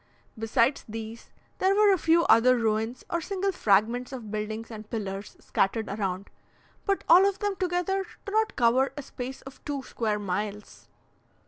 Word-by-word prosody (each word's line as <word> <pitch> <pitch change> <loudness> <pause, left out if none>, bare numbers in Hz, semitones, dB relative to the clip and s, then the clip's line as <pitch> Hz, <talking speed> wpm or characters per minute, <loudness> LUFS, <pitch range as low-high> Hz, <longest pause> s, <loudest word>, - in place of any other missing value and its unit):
Besides 230 +4 +1
these, 225 +1 -7 0.3
there 385 +1 +3
were 415 -1 +6
a - - +2
few 330 +2 +4
other 250 -1 +5
ruins 225 +1 -1
or 340 - -1
single 390 +2 -1
fragments 230 - +2
of 235 -6 -7
buildings 215 +2 -4
and 215 -1 -9
pillars 200 -3 -5
scattered 215 +3 0
around, 195 -1 -3 0.6
but 395 -1 +1
all 375 +3 +7
of 395 - -6
them 410 -1 -1
together 370 +1 0 0.2
do 400 - -5
not 440 +1 +1
cover 250 +2 +3
a 290 - -5
space 260 0 -7
of 270 0 -12
two 285 -2 -4
square 220 -4 -2
miles. 205 +1 -5
240 Hz, 160 wpm, -27 LUFS, 215-340 Hz, 0.6 s, all